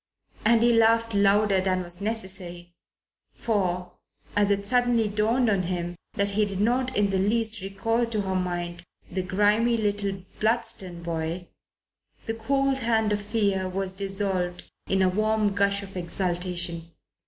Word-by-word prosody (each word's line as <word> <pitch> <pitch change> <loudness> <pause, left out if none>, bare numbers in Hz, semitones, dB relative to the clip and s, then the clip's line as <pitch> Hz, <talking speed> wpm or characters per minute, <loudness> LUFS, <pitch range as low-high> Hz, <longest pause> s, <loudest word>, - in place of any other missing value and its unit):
And 230 +1 +4
he 240 0 +5
laughed 230 0 +3
louder 200 0 +3
than 185 -1 0
was 175 +1 -1
necessary, 185 -5 -3 0.6
for, 180 -5 -1 0.4
as 205 -1 +3
it 200 0 0
suddenly 245 -1 +2
dawned 220 +4 +1
upon 200 -3 +2
him 175 -1 -3 0.2
that 200 0 +2
he 210 +2 +2
did 200 -2 -2
not 250 +4 +1
in 205 -1 +2
the 190 - +1
least 220 +2 0
recall 225 +5 -1
to 220 -2 -1
her 190 -1 -2
mind 175 -1 -3 0.3
the 185 +1 -1
grimy 210 +5 +2
little 200 -3 -1 0.2
Bludston 215 -6 -1
boy, 170 +1 -4 0.8
the 225 - -2
cold 270 +4 0
hand 220 -3 +1
of 205 - -1
fear 200 -3 0
was 190 0 0
dissolved 190 -2 -2 0.2
in 190 0 +2
a - - +4
warm 215 +1 +1
gush 200 0 +2
of 195 -1 -11
exultation. 175 -1 -2
200 Hz, 150 wpm, -26 LUFS, 185-220 Hz, 0.8 s, he